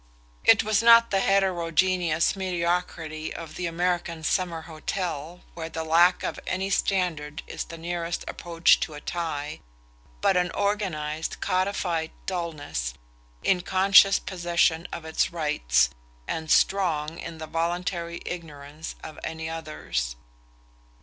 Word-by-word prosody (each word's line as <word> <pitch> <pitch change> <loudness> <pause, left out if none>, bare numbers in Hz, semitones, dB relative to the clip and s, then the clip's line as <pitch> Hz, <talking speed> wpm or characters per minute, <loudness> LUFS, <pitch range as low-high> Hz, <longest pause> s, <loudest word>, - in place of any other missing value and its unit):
It - - +6
was 215 0 +2
not 230 0 +7
the 195 - +3
heterogeneous 180 -3 +2
mediocrity 170 -4 -2
of 165 -2 -7
the 180 - -3
American 170 -1 -1
summer 170 -1 0
hotel 165 0 -4
where 165 -1 -6
the 160 0 -4
lack 170 +3 +4
of - - -3
any 190 +1 -1
standard 160 -6 0
is - - -5
the 165 - -9
nearest 170 0 -3
approach 170 -1 +3
to 155 - -3
a - - -7
tie, 155 -2 -4 0.6
but 190 - +3
an 180 0 +2
organized 160 -7 -1
codified 185 -3 0 0.2
dulness, 150 - -3 0.5
in 180 -2 +3
conscious 195 +2 +6
possession 175 -2 +1
of 165 - -6
its 160 - 0
rights, 150 - +2 0.4
and 160 -1 -3
strong 165 -5 +2
in 165 - -7
the 160 - -6
voluntary 170 +1 -2
ignorance 155 -2 -7
of 155 - -8
any 160 0 -4
others. 155 - -3
170 Hz, 125 wpm, -26 LUFS, 160-180 Hz, 0.6 s, not